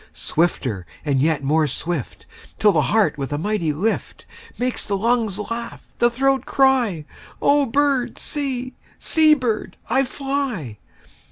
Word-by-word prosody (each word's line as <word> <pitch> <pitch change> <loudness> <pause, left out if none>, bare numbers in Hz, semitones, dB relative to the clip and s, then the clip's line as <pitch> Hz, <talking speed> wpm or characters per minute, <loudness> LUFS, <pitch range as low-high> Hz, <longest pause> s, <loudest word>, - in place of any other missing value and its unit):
Swifter 130 - -1 0.2
and 140 -3 +1
yet 155 -1 +1
more 155 +2 +2
swift, 155 0 -4 0.3
5 - - -38
Till 210 - +5
the - - +2
heart 210 -8 +2
with 135 0 -4
a 145 - -1
mighty 175 -2 0
lift 195 +10 -2 0.3
Makes 250 0 -2
the 200 - 0
lungs 225 -2 +1
laugh, 230 +2 -6
the 240 - +5
throat 270 +2 +1
cry:— 250 - +2 0.3
'O 285 -1 +3
bird, 275 0 +1
see; 260 -3 -3 0.2
see, 310 -1 +4
bird, 245 -6 -2
I 265 +2 +4
fly. 260 - -3
225 Hz, 145 wpm, -21 LUFS, 160-265 Hz, 0.3 s, Till